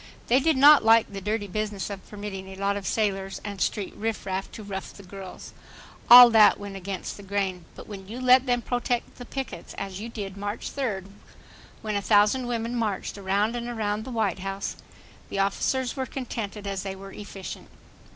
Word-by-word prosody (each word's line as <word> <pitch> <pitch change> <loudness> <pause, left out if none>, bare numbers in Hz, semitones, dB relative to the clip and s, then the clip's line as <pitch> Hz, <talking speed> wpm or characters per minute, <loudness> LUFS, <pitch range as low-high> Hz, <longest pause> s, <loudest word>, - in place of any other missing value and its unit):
They 250 +3 +5
did 315 0 +2
not 290 +1 +8
like 225 -1 +5
the 195 - -5
dirty 210 +2 -1
business 205 0 -3
of 195 -1 -9
permitting 200 -2 -6
a 190 - -9
lot 200 +1 0
of 200 -2 -4
sailors 195 -3 -1
and 200 -2 -5
street 200 -3 -1
rifraff 195 -3 -3
to 220 - -8
rough 195 -1 -6
the 200 - -13
girls. 190 0 -10 0.6
All 245 0 +12
that 220 -2 +6
went 200 -1 -7
against 195 0 -5
the - - -10
grain, 195 -3 -2
but - - -10
when 195 -3 -9
you 230 +5 -7
let 255 +1 +5
them 245 -1 +1
protect 245 -1 -2
the 245 - -7
pickets, 270 +1 -6
as 195 -1 -5
you 225 +3 -6
did 200 -4 -6
March 205 +2 -4
third, 215 -9 -2 0.8
when 215 -1 -2
a 200 - 0
thousand 210 +5 +3
women 235 0 -2
marched 215 -5 -2
around 200 +3 0
and 240 0 -4
around 215 -2 -2
the 260 - -8
White 220 -6 -1
House, 195 +1 -4 0.5
the - - -4
officers 245 +6 0
were 265 - -3
as 260 - -4
contented 220 -5 -5
as 195 -1 -3
they 195 0 -5
were 195 0 -10
efficient. 195 -2 -8
205 Hz, 195 wpm, -26 LUFS, 195-235 Hz, 0.8 s, All